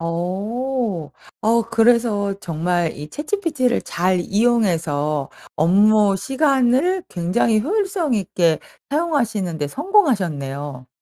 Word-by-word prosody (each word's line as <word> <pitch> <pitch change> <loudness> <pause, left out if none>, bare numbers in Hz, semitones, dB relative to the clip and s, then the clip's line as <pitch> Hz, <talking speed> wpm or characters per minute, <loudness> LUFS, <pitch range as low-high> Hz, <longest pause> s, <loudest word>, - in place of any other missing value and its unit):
어. 190 - -3 0.3
어 230 +2 +2
그래서 225 -4 +2
정말 170 -1 -1
이 150 +1 -8
ChatGPT를 300 -6 -1
잘 180 +1 0
이용해서 170 - 0 0.3
업무시간을 245 - +2
굉장히 205 +5 +1
효율성 375 - 0
있게 170 -6 +1 0.3
사용하시는데 220 - -1
성공하셨네요. 150 - -1
210 Hz, 250 characters per minute, -20 LUFS, 170-260 Hz, 0.3 s, 어